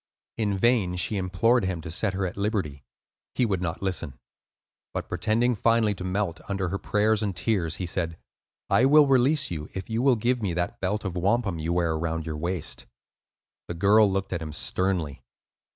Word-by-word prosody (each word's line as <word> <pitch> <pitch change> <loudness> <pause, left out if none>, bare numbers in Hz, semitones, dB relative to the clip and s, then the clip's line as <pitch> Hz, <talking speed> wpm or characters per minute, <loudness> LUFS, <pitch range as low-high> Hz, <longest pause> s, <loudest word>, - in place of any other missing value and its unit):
In 105 -3 0
vain 105 -4 +2
she 95 +4 0
implored 100 +6 +2
him 95 -2 -2
to 80 0 -7
set 95 +3 -1
her 95 0 -1
at 90 - -4
liberty; 100 - -2 0.5
he 125 - +3
would 95 -5 -1
not 85 +1 -3
listen. 90 -8 -2 0.8
But - - -3
pretending 120 +3 +1
finally 115 -1 +2
to 90 - -7
melt 95 -1 -2
under 95 -2 -1
her 100 +2 -3
prayers 105 +2 +1
and 100 -4 -2
tears, 90 -4 0
he 90 - -4
said, 85 -1 -3 0.5
"I 125 - +4
will 150 +2 +7
release 135 +1 +3
you 75 -3 -5
if 95 +4 -6
you 115 +1 0
will 135 -1 +4
give 120 +2 0
me 95 -5 -1
that 90 0 -2
belt 105 +3 -1
of 95 -2 -3
wampum 95 0 0
you 80 +2 -2
wear 85 -2 +1
around 80 0 -2
your 80 -2 -4
waist." 85 +1 -3 0.8
The 85 - -5
girl 100 +3 +5
looked 95 0 -2
at 85 - -3
him 75 -1 -6
sternly. 85 -3 -1
95 Hz, 190 wpm, -26 LUFS, 85-110 Hz, 0.8 s, will